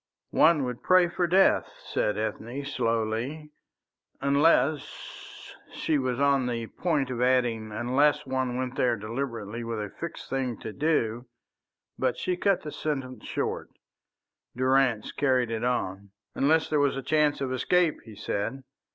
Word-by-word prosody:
"One 160 -3 +5
would 125 -1 -4
pray 185 -1 +4
for 175 0 0
death," 190 +3 +4 0.2
said 105 - -1
Ethne, 120 +5 -4
slowly, 120 +4 -2 0.7
"unless 145 +1 +3 0.5
" - - -14
She 155 -3 +1
was 130 -1 -1
on 140 -2 +3
the 115 -2 -2
point 145 -1 -1
of 125 -1 -3
adding 120 -4 +1
"unless 130 +7 +2
one 130 -2 -1
went 130 -1 -2
there 120 -2 +2
deliberately 115 0 -4
with 115 -1 -3
a 105 -1 -5
fixed 170 -1 -7
thing 130 -4 -2
to 110 - -6
do," 125 -6 0 0.7
but 130 -1 0
she 185 - -1
cut 195 +1 +1
the 150 - -6
sentence 135 -3 -4
short. - - -3 0.9
Durrance 130 -4 +2
carried 130 -4 +1
it 115 0 -2
on: 100 -5 -2 0.2
"Unless 160 +3 +2
there 150 - +3
was 140 -1 +2
a 135 - -4
chance 150 0 +2
of 130 -2 -2
escape," 165 +5 +2
he 110 -2 -12
said. 115 +6 -3
130 Hz, 150 wpm, -27 LUFS, 115-145 Hz, 0.9 s, One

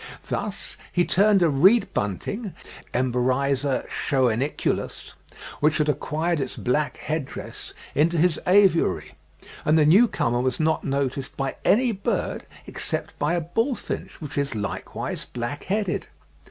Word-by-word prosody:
Thus - - -4
he 175 -1 +2
turned 200 0 +4
a - - +5
reed 190 - +5
bunting 185 - -3 0.4
(Emberiza 130 +2 +1
schoeniculus), 130 0 -1 0.5
which 150 0 +3
had 150 -1 +1
acquired 155 +3 0
its 135 -2 -4
black 130 +2 0
head 155 0 -2
dress, - - -9 0.2
into 165 +4 +2
his 165 0 +3
aviary, 190 -2 +3 0.5
and 155 +1 +4
the 155 - +5
new 200 +11 +7
comer 120 - 0
was 130 -1 -1
not 160 0 +1
noticed 135 -1 -2
by 135 -1 -2
any 245 +3 +4
bird, 200 -2 -2 0.2
except - - -4
by 150 +4 +1
a 175 - 0
bullfinch, 225 - -3
which 145 -2 -4
is 140 -4 -1
likewise 105 -2 -4
black 125 +4 -5
headed. 200 -1 -1
150 Hz, 135 wpm, -24 LUFS, 135-180 Hz, 0.5 s, new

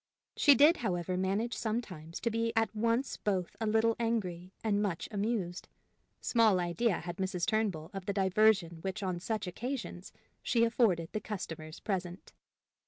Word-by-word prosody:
She 285 -2 +6
did, 300 +5 +6
however, 180 -5 -1
manage 195 +6 0
sometimes 190 -8 -4
to 235 - 0
be 230 +1 0
at 225 0 +1
once 230 +4 0
both 190 -4 -1
a 220 - 0
little 225 +1 +3
angry 190 -6 -2
and 205 -2 +1
much 190 -6 -2
amused. 200 -4 -2 0.5
Small 220 -5 +4
idea 180 +4 0
had 175 0 -6
Mrs. 185 -2 -1
Turnbull 210 -8 -1
of 195 -2 -6
the 200 - 0
diversion 190 -3 +3
which 195 +3 -4
on 185 -2 -1
such 210 +2 -2
occasions 230 -1 -5 0.3
she 230 -2 +2
afforded 220 -8 +2
the 215 - -3
customers 165 -7 -6
present. 185 -2 -4
200 Hz, 155 wpm, -32 LUFS, 180-225 Hz, 0.5 s, She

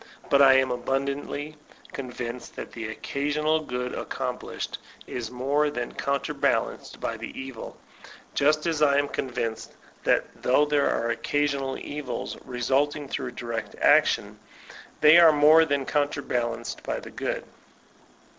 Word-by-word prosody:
But 140 - +6
I 135 -1 +8
am 130 -1 +3
abundantly 140 +4 -3 0.4
convinced 125 -2 -6
that - - -7
the 115 -2 -5
occasional 150 +7 -1
good 125 -4 -4
accomplished - - -4 0.3
is 120 -3 -5
more 140 +4 +1
than 120 -4 -4
counterbalanced 140 -1 -1
by - - -3
the - - -7
evil; 130 -3 -8 0.6
just 150 +2 +2
as 160 -2 0
I 140 -2 +5
am 145 0 +2
convinced 120 -5 -3 0.3
that - - +3 0.2
though 130 +4 +4
there 145 -1 +2
are 115 0 0
occasional 140 0 -1
evils 145 -4 -5
resulting 135 +4 0
from 130 -3 -4
direct 115 -2 -5
action, - - +3 0.6
they 155 +3 +8
are 165 -2 +9
more 155 +2 +6
than 140 -3 0
counterbalanced 140 -5 -1
by - - -3
the - - -11
good. - - -3
140 Hz, 130 wpm, -26 LUFS, 125-145 Hz, 0.6 s, are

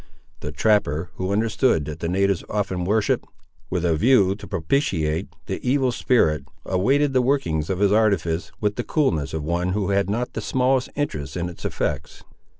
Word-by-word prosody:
The - - -5
trapper, 90 -6 +1
who 95 +1 -2
understood 110 - +2
that 75 +1 -6
the 85 - -2
natives 100 0 +1
often 95 -4 -1
worshipped, 105 +2 +1 0.5
with 90 -1 -1
a 85 -2 +2
view 100 +1 +4
to 100 - -10
propitiate, 80 - 0 0.2
the - - -3
evil 130 0 +2
spirit, 80 - +2 0.2
awaited 135 +10 +2
the 130 - +4
workings 105 - 0
of 95 - 0
his 100 +1 +3
artifice, 90 -7 +1
with 105 -1 -1
the 120 - -1
coolness 120 - 0
of 80 -1 -3
one 90 +3 -1
who 100 -1 -1
had 100 0 +1
not 120 +4 -2
the 110 - -3
smallest 130 +4 +1
interest 75 - -3
in 85 0 -2
its 85 - -10
effects. 75 0 -3
100 Hz, 175 wpm, -23 LUFS, 80-120 Hz, 0.5 s, view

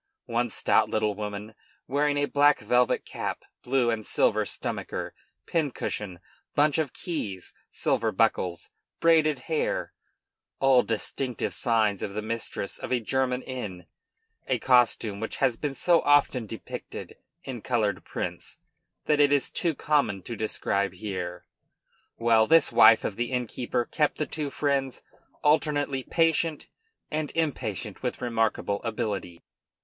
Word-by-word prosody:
One 120 +1 0
stout - - +2
little 110 -1 +1
woman, 105 +1 -6 0.3
wearing 145 +2 +1
a 145 - +2
black 145 +1 +4
velvet 125 +4 +2
cap, - - -4 0.2
blue 125 -2 +2
and 110 -1 -2
silver - - +2
stomacher, - - -4 0.3
pincushion, 110 - -2 0.4
bunch 150 +1 +3
of 150 -5 -1
keys, 105 - -4 0.2
silver - - 0
buckles, 85 -2 0 0.3
braided 160 -3 +4
hair, - - -1 0.7
all 135 -2 +5
distinctive 120 +3 -2
signs 110 -5 +1
of 100 - -4
the 105 - -2
mistress 110 -3 -4
of - - -6
a 125 - +3
German 125 +2 0
inn 100 -9 -6 0.6
(a - - +1
costume 120 -5 +3
which 110 - -4
has 130 -3 +2
been 140 +2 -3
so 170 +2 +3
often 140 -5 +3
depicted 115 - -8 0.3
in 125 -4 -6
colored 105 -6 0
prints - - -5 0.5
that 150 -1 +2
it 145 -1 +5
is 145 -2 +2
too 165 -3 0
common 140 -13 +1
to 120 - -5
describe 100 -3 -1
here), 90 -3 -5 0.7
well, 115 -1 +4
this 165 0 +5
wife 110 +1 +7
of 100 - -3
the 120 +1 -2
innkeeper 125 0 -1
kept 150 -2 0
the 150 - 0
two 150 -2 -4
friends 140 -2 -1 0.4
alternately 145 -2 +2
patient 165 +1 +1 0.4
and 155 -1 -2
impatient 120 - -2
with 125 - -3
remarkable 115 -4 0
ability. 105 -7 -4
125 Hz, 135 wpm, -27 LUFS, 110-145 Hz, 0.7 s, wife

